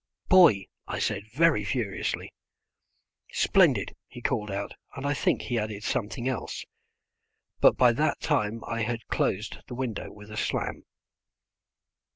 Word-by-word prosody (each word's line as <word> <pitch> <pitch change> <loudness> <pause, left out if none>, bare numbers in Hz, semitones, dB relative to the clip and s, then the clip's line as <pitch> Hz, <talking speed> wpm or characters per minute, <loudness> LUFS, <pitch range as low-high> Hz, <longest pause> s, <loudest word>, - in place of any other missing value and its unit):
"Boy," 170 - +7 0.2
I - - -3
said, 105 +1 -2
very 150 -3 +3
furiously. 105 -2 -2 1.0
"Splendid," - - +3
he 125 - -10
called 115 -4 -1
out, 100 +1 -3 0.2
and 140 0 -5
I 145 - +2
think - - +1
he 120 -3 -1
added 105 -1 -4
something 120 +3 -2
else, 130 -2 -3 0.9
but - - +6
by 125 -1 +6
that 150 +6 +1
time 115 -6 0
I 115 0 -2
had 115 0 -2
closed 105 +3 0
the 125 - -6
window 120 -5 -4
with 105 0 -13
a 105 - -7
slam. - - -2
115 Hz, 140 wpm, -28 LUFS, 105-130 Hz, 1.0 s, Boy